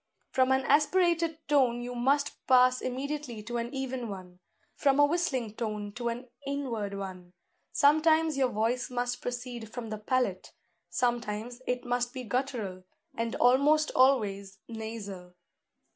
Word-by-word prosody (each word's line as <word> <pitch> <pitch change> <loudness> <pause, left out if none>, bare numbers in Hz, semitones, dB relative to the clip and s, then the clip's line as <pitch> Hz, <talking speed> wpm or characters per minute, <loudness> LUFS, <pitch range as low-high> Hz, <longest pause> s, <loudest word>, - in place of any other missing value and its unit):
From 260 0 +3
an 265 0 +3
aspirated 330 +2 +2
tone 255 -5 +3
you 245 0 -5
must 275 +4 +2 0.2
pass 255 0 +5
immediately 260 -3 -4
to 240 +2 -4
an 235 +1 -3
even 260 -3 -4
one; 180 -2 -9 0.3
from 275 -1 +2
a 290 - +8
whistling 290 -9 -1
note 210 -2 -3
to 240 -1 -1
an 240 +2 -5 0.2
inward 250 -8 -3
one: 185 -2 -7 0.4
sometimes 315 +1 +4
your 265 -2 +2
voice 230 +3 0
must 245 0 -2
proceed 245 -2 -5
from 230 -2 -6
the 215 - -4
palate; 215 -4 -1 0.4
sometimes 240 +3 -2
it 250 0 -1
must 245 0 -1
be 255 - -4
guttural, 225 -6 -3 0.3
and 230 -2 -2
almost 285 +5 +4
always 200 -7 +2
nasal. 210 -6 -7
245 Hz, 140 wpm, -29 LUFS, 220-270 Hz, 0.4 s, a